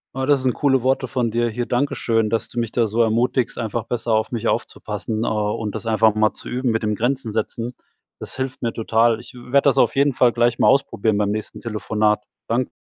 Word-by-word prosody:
Oh, 130 0 -1
das 140 -1 +3
sind 130 -2 +2
coole 135 -3 +2
Worte 130 0 +1
von 120 -1 -1
dir, 120 +1 +1
hier. 120 +2 -3
Dankeschön, 120 -4 0
dass 115 +1 -1
du 120 - -4
mich 115 -2 -2
da 120 - +2
so 110 +2 0
ermutigst, 115 +2 +1
einfach 115 0 -3
besser 120 -1 -3
auf 110 +2 0
mich 115 -1 -1
aufzupassen 110 -1 -3
äh, - - -1
und 105 -1 -1
das - - -6
einfach 110 -1 +3
mal 110 0 +2
zu - - -9
üben 125 0 0
mit 115 0 -1
den 105 0 0
Grenzen 120 +1 -1
setzen. 115 +2 -3 0.5
Das - - -7
hilft 130 0 -4
mir 115 -2 -1
total. 115 0 +2
Ich 120 - -14
w 125 +1 -12
werd 140 - +4
das 140 -4 +4
auf - - +3
jeden 140 +1 +3
Fall 125 -2 +3
gleich 120 0 +1
mal - - +4
ausprobieren 110 -6 +2
beim 100 -1 +1
nächsten 110 0 -5
Telefonat. 105 -2 0 0.2
Dank 120 +2 +1
115 Hz, 230 wpm, -21 LUFS, 110-125 Hz, 0.5 s, werd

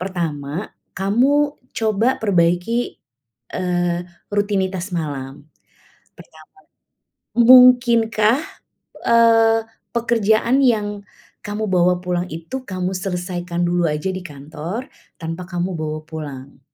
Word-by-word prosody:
pertama, 170 -3 -3 0.3
kamu 275 +9 +2 0.2
coba 225 +3 +1
perbaiki, 180 +4 +1 0.6
eee, 175 -1 0 0.4
rutinitas 195 -2 -1
malam, 140 -3 -5 0.7
pertama. - - -16 0.9
Mungkinkah, 240 -1 +6 0.7
eee, 225 -1 +5 0.3
pekerjaan 235 +2 +2
yang 210 -4 +1 0.4
kamu 210 +1 -3
bawa 180 0 +3
pulang 180 0 -1
itu 165 +12 -6
kamu 185 0 -2
selesaikan 180 -2 -3
dulu 175 0 +1
aja 150 +5 -2
di 185 - -5
kantor 155 - -6 0.3
tanpa 165 +2 -5
kamu 175 +1 -2
bawa 155 0 -3
pulang? 140 -4 -8
185 Hz, 95 wpm, -20 LUFS, 170-225 Hz, 0.9 s, Mungkinkah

